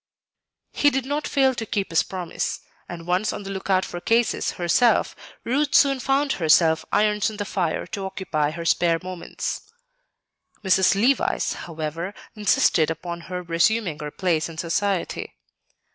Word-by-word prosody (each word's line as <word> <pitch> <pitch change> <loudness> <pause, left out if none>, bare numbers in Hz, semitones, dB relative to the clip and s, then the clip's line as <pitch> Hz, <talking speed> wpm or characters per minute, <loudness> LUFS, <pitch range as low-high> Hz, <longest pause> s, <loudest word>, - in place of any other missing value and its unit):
He 290 - +3
did 270 -2 -2
not 290 +2 -2
fail 270 -2 +3
to 235 - -4
keep 200 -4 -2
his 165 - +4
promise; 180 -3 -4 0.3
and 170 -1 -7
once 180 +4 +1
on - - -6
the 195 - -6
lookout 190 -1 0
for 175 - -7
"cases" 230 +3 +1
herself, 185 +7 +2 0.3
Ruth 285 +4 0
soon 275 -2 +5
found 275 +2 +1
enough 160 0 +4
irons 210 0 +2
in 215 - -9
the 205 - -3
fire 180 -5 -1
to 195 -1 -5
occupy 155 -6 -1
her 165 +2 -6
spare 165 0 +3
moments. 185 -2 -5 1.0
Mrs. 190 0 +4
Levice, 255 +5 +2
however, 165 +3 -5 0.2
insisted 185 -6 +3
upon 170 +1 -5
her 180 -1 -4
resuming 170 0 +1
her 150 0 -5
place 170 -1 -1
in 165 - -10
society. 180 +3 -2
185 Hz, 150 wpm, -23 LUFS, 170-220 Hz, 1.0 s, soon